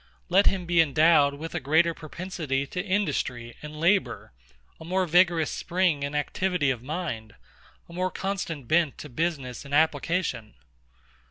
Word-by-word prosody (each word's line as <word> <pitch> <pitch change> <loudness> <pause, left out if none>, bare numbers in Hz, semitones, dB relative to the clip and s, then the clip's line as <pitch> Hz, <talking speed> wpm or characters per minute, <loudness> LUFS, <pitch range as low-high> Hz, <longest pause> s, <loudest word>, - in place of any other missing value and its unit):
Let 195 +3 +4
him 185 -2 +1
be 170 -1 +4
endowed 155 -1 +4
with 160 +3 -7
a 175 - -1
greater 160 +5 +3
propensity 160 -4 -4
to 180 +6 -4
industry 185 - -2
and 150 0 -8
labour; 180 - +1 0.5
a - - -10
more 185 +3 0
vigorous 170 -2 +3
spring 175 -5 0
and 140 +1 -3
activity 170 0 0
of 120 -3 -4
mind; 130 -7 -5 0.5
a 170 - -14
more 185 +1 -1
constant 175 -9 -4
bent 160 -1 +2
to 150 - -9
business 140 -3 -3
and 140 0 -3
application. 150 - 0
160 Hz, 150 wpm, -26 LUFS, 140-180 Hz, 0.5 s, Let